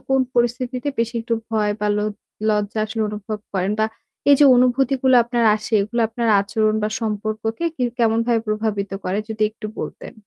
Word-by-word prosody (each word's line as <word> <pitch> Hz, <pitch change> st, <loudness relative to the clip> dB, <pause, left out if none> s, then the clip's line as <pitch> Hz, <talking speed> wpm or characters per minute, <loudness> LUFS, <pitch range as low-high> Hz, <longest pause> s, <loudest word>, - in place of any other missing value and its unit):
কোন 265 Hz, 0 st, +4 dB
পরিস্থিতিতে 245 Hz, +2 st, 0 dB
বেশি 230 Hz, +1 st, 0 dB
একটু 230 Hz, 0 st, -1 dB, 0.2 s
ভয় 210 Hz, -2 st, +1 dB
বা 210 Hz, -, 0 dB
লোজ 210 Hz, 0 st, -1 dB, 0.4 s
লজ্জা 210 Hz, 0 st, 0 dB
আসলে 220 Hz, +1 st, -2 dB
অনুভব 210 Hz, +1 st, -5 dB
করেন 190 Hz, +1 st, 0 dB
বা -, -, +4 dB, 0.5 s
এই -, -, +9 dB
যে -, -, +8 dB
অনুভূতিগুলো 260 Hz, +1 st, +3 dB
আপনার 235 Hz, 0 st, 0 dB
আসে 215 Hz, +1 st, -9 dB
এগুলা 230 Hz, +4 st, -1 dB
আপনার 230 Hz, 0 st, -2 dB
আচরণ 215 Hz, +2 st, 0 dB
বা 210 Hz, -, +1 dB
সম্পর্ককে 215 Hz, +4 st, -3 dB
কি 255 Hz, -, -3 dB, 0.2 s
কেমনভাবে 230 Hz, 0 st, +2 dB
প্রভাবিত 215 Hz, -2 st, -1 dB
করে 185 Hz, +2 st, -1 dB
যদি 220 Hz, -1 st, -3 dB
একটু 215 Hz, 0 st, -8 dB
বলতেন? -, -, -7 dB
225 Hz, 170 wpm, -21 LUFS, 210-240 Hz, 0.5 s, এই